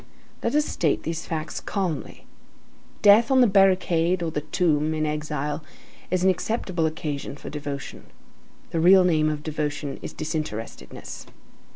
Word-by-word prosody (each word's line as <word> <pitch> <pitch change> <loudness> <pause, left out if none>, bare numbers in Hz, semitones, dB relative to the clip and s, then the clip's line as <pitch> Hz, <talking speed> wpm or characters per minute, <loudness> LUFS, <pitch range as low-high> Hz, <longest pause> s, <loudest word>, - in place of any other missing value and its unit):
Let - - -1
us 300 0 +3
state 155 -4 0
these 165 +1 -4
facts 155 -1 -3
calmly. 180 -8 -3 0.8
Death 215 +3 +7
on 265 -1 +4
the - - +7
barricade 185 -4 +3
or 165 - -2
the 150 - -2
tomb 155 0 +1
in 155 0 0
exile, 150 0 -3 0.5
is 185 -1 0
an 190 - +5
acceptable 185 -4 -1
occasion 150 -3 -4
for - - -8
devotion. 145 -2 -6 0.6
The 165 - 0
real 185 +3 +7
name 155 -4 +3
of 150 -1 -4
devotion 150 -2 -3
is - - -6
disinterestedness. 155 -8 -6
160 Hz, 145 wpm, -25 LUFS, 150-185 Hz, 0.8 s, Death